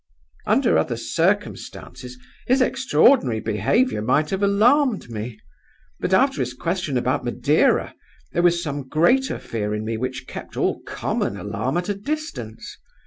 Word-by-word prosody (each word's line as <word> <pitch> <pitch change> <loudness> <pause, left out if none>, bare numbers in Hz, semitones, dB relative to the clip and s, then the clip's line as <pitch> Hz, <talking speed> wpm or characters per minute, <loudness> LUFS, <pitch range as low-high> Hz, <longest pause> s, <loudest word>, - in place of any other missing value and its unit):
"Under - - +3
other - - -1
circumstances, 125 0 -2 0.3
his 255 +2 +3
extraordinary 245 - +3
behavior 110 - +1
might 135 +7 +1
have 190 0 -1
alarmed 215 - +3
me. 110 0 -6 0.6
But - - -2
after 250 - +3
his 125 0 -3
question 165 -2 -2
about 130 +3 0
Madeira, 125 +5 +2 0.4
there - - +1
was 175 0 +3
some 145 -3 -4
greater 245 - +2
fear 105 -2 -3
in 105 +1 -4
me 115 0 -2
which 130 +2 -4
kept - - -9
all - - 0
common 100 - -2
alarm 115 +9 -2
at 175 - -2
a 205 - 0
distance. 200 - -6
145 Hz, 140 wpm, -22 LUFS, -, 0.6 s, Under